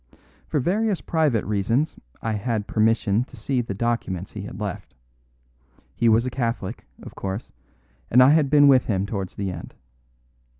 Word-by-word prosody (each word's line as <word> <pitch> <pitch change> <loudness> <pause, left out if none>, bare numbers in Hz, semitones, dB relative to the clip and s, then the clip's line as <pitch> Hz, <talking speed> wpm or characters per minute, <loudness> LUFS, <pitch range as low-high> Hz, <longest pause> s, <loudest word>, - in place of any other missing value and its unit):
For 150 - 0
various 200 - +1
private 150 -9 +1
reasons 110 +8 0 0.3
I 115 - -1
had 110 0 -2
permission 110 0 +2
to 130 - -15
see 125 +3 -1
the 105 -4 -5
documents 100 -5 -2
he 105 - -7
had 100 -1 -8
left; 105 -4 -5 1.0
he 115 - +3
was 115 +2 +4
a 130 - -2
Catholic, 115 -6 -3 0.2
of - - -10
course, 95 +3 -5 0.6
and 125 +2 +7
I 130 - +7
had 150 -3 +3
been 145 0 +6
with 130 -2 +5
him 95 -3 0
towards 100 -3 -4
the 100 -2 -3
end. 85 -1 -9
115 Hz, 165 wpm, -24 LUFS, 100-130 Hz, 1.0 s, and